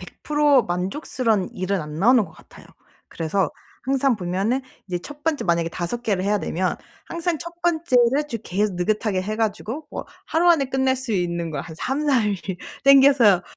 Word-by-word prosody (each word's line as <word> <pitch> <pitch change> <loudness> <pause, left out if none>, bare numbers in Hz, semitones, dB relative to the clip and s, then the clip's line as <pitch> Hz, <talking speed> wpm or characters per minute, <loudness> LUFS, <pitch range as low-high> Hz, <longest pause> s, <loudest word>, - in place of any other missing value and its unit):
100 - - -13
프로 295 -4 +4
만족스러운 195 - -1
일은 185 +1 -1
안 150 -1 -7
나오는 230 +6 +5
것 165 - -13
같아요. 160 - -17 0.4
그래서 165 +1 -1 0.3
항상 270 0 +2
보면은 195 +8 -1 0.2
이제 180 -2 -2
첫 290 +8 -11
번째 320 -3 0
만약에 170 -1 +1
5 185 +9 -4
개를 200 -5 0
해야 205 +1 +2
되면 185 -1 -1 0.3
항상 340 0 -2
첫 340 +1 -7
번째를 295 -4 +2
좀 230 - -3
계속 200 +1 -1
느긋하게 205 +1 0
해 215 +3 -3
가지고 225 +6 -3
뭐 - - -6 0.2
하루 335 +2 +2
안에 300 -5 +3
끝낼 265 0 +1
수 260 -1 -6
있는 170 -3 -1
걸 145 -3 -4
한 165 -1 -10
3-4 265 - +1
일 205 -1 0 0.5
당겨서 270 -9 +6
220 Hz, 320 characters per minute, -23 LUFS, 185-275 Hz, 0.5 s, 당겨서